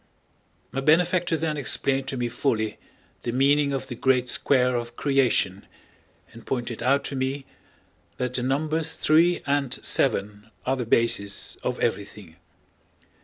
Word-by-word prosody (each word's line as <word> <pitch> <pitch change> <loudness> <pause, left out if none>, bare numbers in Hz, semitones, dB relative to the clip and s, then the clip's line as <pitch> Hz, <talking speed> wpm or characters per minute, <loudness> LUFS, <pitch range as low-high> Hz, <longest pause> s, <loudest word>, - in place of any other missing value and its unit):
My 135 - -3
benefactor 170 +3 +2
then 155 -1 -2
explained 135 -1 0
to 135 - -3
me 120 -1 -1
fully 115 -3 -1 0.4
the 120 - -3
meaning 140 +3 +3
of 135 - -3
the - - -7
Great 125 +1 +1
Square 125 -2 +2
of 120 0 -4
creation 125 -9 +1 0.7
and 115 - -12
pointed 120 -3 -4
out 135 +4 +2
to 140 - -3
me 135 +1 -2 0.7
that 125 0 -2
the 125 - -2
numbers 155 +5 -1
three 170 +3 +3
and 140 -2 0
seven 105 -3 +1 0.2
are 130 - +1
the 125 -2 -3
basis 115 -4 +1
of - - -4
everything. 100 -4 -4
130 Hz, 140 wpm, -25 LUFS, 120-145 Hz, 0.7 s, meaning